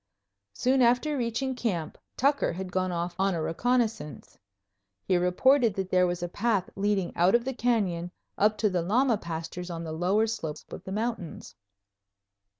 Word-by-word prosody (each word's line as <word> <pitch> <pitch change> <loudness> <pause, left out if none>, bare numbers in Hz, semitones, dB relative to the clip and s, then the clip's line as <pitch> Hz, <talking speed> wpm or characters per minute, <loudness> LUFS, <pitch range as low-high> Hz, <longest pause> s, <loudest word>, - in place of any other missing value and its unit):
Soon 260 - +2
after 250 +5 +3
reaching 250 +1 -1
camp 190 -11 -2 0.2
Tucker 280 +2 +2
had 185 +1 -6
gone 185 0 0
off 175 0 -2
on 195 -1 +2
a 165 - -2
reconnaissance. 220 - -1 0.7
He 185 - +1
reported 220 +6 +3
that 190 -1 -3
there 180 0 +4
was 175 0 -3
a - - -1
path 200 0 0
leading 200 -2 0
out 180 +5 +4
of 235 0 +2
the 265 - -2
canyon 200 -9 0 0.3
up 215 +1 +2
to 210 0 +2
the 180 -2 +1
llama 225 +5 +2
pastures 170 +1 -6
on 170 -1 -5
the 160 - -5
lower 185 +7 +2
slopes 165 -9 -5
of - - -8
the 190 - -6
mountains. 215 -4 -4
195 Hz, 165 wpm, -28 LUFS, 175-235 Hz, 0.7 s, there